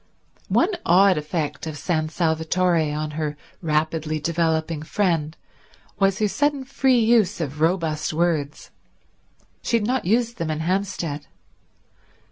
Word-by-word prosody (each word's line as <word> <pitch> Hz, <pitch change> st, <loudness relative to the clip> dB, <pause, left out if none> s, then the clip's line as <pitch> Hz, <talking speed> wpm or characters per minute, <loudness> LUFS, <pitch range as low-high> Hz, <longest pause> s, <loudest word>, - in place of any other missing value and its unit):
One 355 Hz, -, +3 dB
odd 185 Hz, 0 st, +5 dB
effect 150 Hz, +1 st, -3 dB
of 155 Hz, -2 st, -5 dB
San 155 Hz, -1 st, -1 dB
Salvatore 160 Hz, 0 st, +1 dB
on 150 Hz, +1 st, -3 dB
her 150 Hz, -1 st, -3 dB, 0.2 s
rapidly 155 Hz, -1 st, -1 dB
developing 160 Hz, 0 st, 0 dB
friend 160 Hz, -2 st, -1 dB, 0.6 s
was 195 Hz, -1 st, +3 dB
her 215 Hz, -, +2 dB
sudden 290 Hz, +5 st, 0 dB
free 265 Hz, -1 st, +2 dB
use 225 Hz, -5 st, +3 dB
of 150 Hz, -2 st, -4 dB
robust 160 Hz, -3 st, +1 dB
words. 155 Hz, -3 st, -1 dB, 0.9 s
She 235 Hz, -, +1 dB
had 210 Hz, -, -2 dB
not 250 Hz, -1 st, 0 dB
used 235 Hz, +4 st, +1 dB
them 165 Hz, -1 st, -3 dB
in 155 Hz, 0 st, -2 dB
Hampstead. 175 Hz, -4 st, -2 dB
165 Hz, 125 wpm, -23 LUFS, 155-195 Hz, 0.9 s, odd